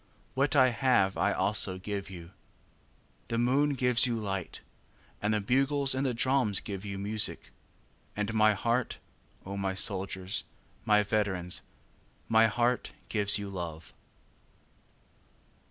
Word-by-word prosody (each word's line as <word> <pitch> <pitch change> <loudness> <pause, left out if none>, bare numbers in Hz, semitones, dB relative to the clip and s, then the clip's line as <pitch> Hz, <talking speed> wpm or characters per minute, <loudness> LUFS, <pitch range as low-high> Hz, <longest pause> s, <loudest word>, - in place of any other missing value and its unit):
What 135 +2 0
I 130 -2 +6
have 115 -6 +1
I 105 - +1
also 95 -1 +1
give 100 +1 -5
you. 85 -3 -10
9. - - -23 1.0
The 115 0 -2
moon 130 +5 +2
gives 125 -1 +3
you 120 -2 -1
light, 100 -4 -5 0.6
And 105 - 0
the 105 - +1
bugles 135 +5 +2
and 130 +1 -1
the 130 -3 -1
drums 125 -5 +2
give 100 -2 -7
you 100 -1 -6
music; 105 +2 0 0.6
And 105 +1 -3
my 110 -1 +4
heart, 120 +4 -1 0.5
O 100 +1 -6
my 95 -1 -2
soldiers, 95 -1 -1 0.4
my 105 -1 +4
veterans, 100 -4 -1 0.7
My 115 0 +4
heart 120 +3 0 0.2
gives 105 -1 +5
you 100 -1 -6
love. 85 -3 -7
105 Hz, 135 wpm, -29 LUFS, 95-125 Hz, 1.0 s, I